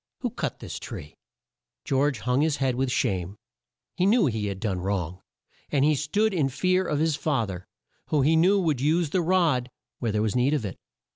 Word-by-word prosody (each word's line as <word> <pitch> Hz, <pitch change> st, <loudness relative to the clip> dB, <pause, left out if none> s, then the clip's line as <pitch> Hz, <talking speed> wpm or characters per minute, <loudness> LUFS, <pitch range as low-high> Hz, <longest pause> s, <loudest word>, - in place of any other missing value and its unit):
Who -, -, -2 dB
cut -, -, -3 dB
this -, -, -6 dB
tree?" 75 Hz, -, -8 dB, 0.7 s
George 135 Hz, -3 st, +1 dB
hung 125 Hz, +2 st, +1 dB
his 155 Hz, -1 st, +2 dB
head 135 Hz, -2 st, +1 dB
with 130 Hz, +1 st, -1 dB
shame. 95 Hz, -7 st, -1 dB, 0.6 s
He 185 Hz, -, +2 dB
knew 220 Hz, -2 st, +4 dB
he 110 Hz, -6 st, -1 dB
had 100 Hz, -1 st, -4 dB
done 95 Hz, -3 st, -2 dB
wrong; 90 Hz, -2 st, -3 dB, 0.5 s
and 140 Hz, -1 st, +3 dB
he 155 Hz, -, +4 dB
stood 195 Hz, +10 st, +1 dB
in 150 Hz, -7 st, +1 dB
fear 185 Hz, +6 st, +1 dB
of 150 Hz, -, 0 dB
his 160 Hz, 0 st, +1 dB
fa 140 Hz, -7 st, 0 dB
ther, 90 Hz, -2 st, -7 dB, 0.4 s
who 150 Hz, -3 st, +2 dB
he 160 Hz, +4 st, +4 dB
knew 185 Hz, +5 st, +4 dB
would 155 Hz, -8 st, 0 dB
use 155 Hz, +2 st, +1 dB
the 185 Hz, -, +2 dB
rod 165 Hz, -8 st, +2 dB, 0.3 s
where 115 Hz, -3 st, -1 dB
there 105 Hz, 0 st, 0 dB
was 110 Hz, 0 st, -1 dB
need 130 Hz, +4 st, +3 dB
of 130 Hz, -7 st, -2 dB
it. 95 Hz, -, -6 dB
135 Hz, 205 wpm, -26 LUFS, 110-160 Hz, 0.7 s, knew